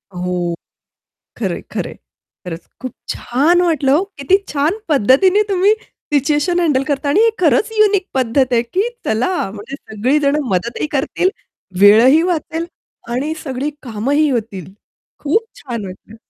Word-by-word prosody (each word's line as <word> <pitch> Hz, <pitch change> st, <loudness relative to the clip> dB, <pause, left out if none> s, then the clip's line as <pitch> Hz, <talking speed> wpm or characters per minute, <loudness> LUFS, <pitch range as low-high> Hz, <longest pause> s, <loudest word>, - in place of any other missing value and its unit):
हो. 180 Hz, -1 st, -2 dB, 0.8 s
खरं -, -, -2 dB
आहे, -, -, -7 dB
खरं -, -, -3 dB
आहे. -, -, -12 dB, 0.5 s
खरंच 165 Hz, -1 st, -7 dB
खूप 255 Hz, -1 st, -5 dB, 0.2 s
छान 310 Hz, +9 st, +1 dB
वाटलं 310 Hz, -6 st, +2 dB
हो, 320 Hz, +6 st, +4 dB, 0.2 s
किती 280 Hz, +8 st, +3 dB
छान 305 Hz, +8 st, 0 dB
पद्धतीने 300 Hz, -, +4 dB
तुम्ही 390 Hz, +1 st, +3 dB, 0.4 s
सिच्युएशन 295 Hz, +5 st, +2 dB
हँडल 295 Hz, -6 st, +2 dB
करता 285 Hz, 0 st, -2 dB
आणि 295 Hz, +10 st, +3 dB
हे 455 Hz, -, +4 dB
खरंच 335 Hz, -, +3 dB
युनिक 405 Hz, -2 st, +3 dB
पद्धत 255 Hz, 0 st, +1 dB
आहे, 235 Hz, -1 st, +3 dB
की 380 Hz, -, -1 dB, 0.2 s
चला 235 Hz, -, 0 dB
म्हणजे 215 Hz, +7 st, -8 dB
सगळी 245 Hz, +5 st, -1 dB
जण 280 Hz, 0 st, +2 dB
मदतही 215 Hz, +10 st, -1 dB
करतील, 295 Hz, +6 st, 0 dB, 0.5 s
वेळही 230 Hz, +10 st, +7 dB
वाचेल 335 Hz, -1 st, -2 dB, 0.5 s
आणि 295 Hz, +6 st, -1 dB
सगळी 270 Hz, +2 st, -3 dB
कामंही 270 Hz, +6 st, 0 dB
होतील. 205 Hz, -, -4 dB, 0.5 s
खूप 380 Hz, +10 st, +1 dB, 0.2 s
छान 235 Hz, -6 st, -5 dB
वाटलं. 190 Hz, +4 st, -12 dB
280 Hz, 145 wpm, -17 LUFS, 230-330 Hz, 0.8 s, वेळही